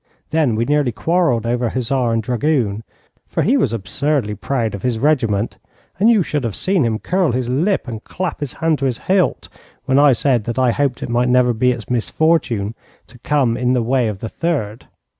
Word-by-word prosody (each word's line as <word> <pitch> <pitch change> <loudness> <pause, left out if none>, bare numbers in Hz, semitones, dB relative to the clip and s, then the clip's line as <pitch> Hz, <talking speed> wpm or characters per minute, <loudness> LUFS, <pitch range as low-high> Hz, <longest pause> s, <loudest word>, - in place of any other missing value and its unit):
Then 155 -8 +2
we 115 +2 0
nearly 145 -2 +1
quarrelled 160 -4 +1
over 120 0 0
hussar 125 0 -1
and 115 -1 0
dragoon, 120 -3 0 0.4
for - - -1
he 250 - +3
was 135 - +1
absurdly 115 +3 -1
proud 115 +1 -2
of 100 - -6
his 120 0 -1
regiment, 115 -6 0 0.4
and 215 +4 +5
you 220 -5 +4
should 150 -3 -2
have 115 -4 -3
seen 185 -5 +1
him 110 -2 0
curl 180 - 0
his 125 -1 -2
lip 165 +7 0
and 115 -2 -6
clap 185 -3 -4
his 145 -4 -4
hand 160 -2 0
to 135 - -1
his 125 -3 0
hilt 185 -2 0 0.4
when 130 +1 +3
I 145 -2 +6
said 120 -3 +1
that 120 0 -4
I 130 -2 +3
hoped 140 -1 -1
it - - -5
might 120 +1 +1
never 125 -1 +3
be 125 +3 +2
its 120 -3 -5
misfortune 125 -4 0 0.3
to 125 - -18
come 130 -3 +1
in 125 +1 0
the 125 -2 +1
way 125 0 +1
of 105 -3 -5
the 115 - -3
Third. 130 -11 -3
125 Hz, 205 wpm, -19 LUFS, 115-150 Hz, 0.4 s, I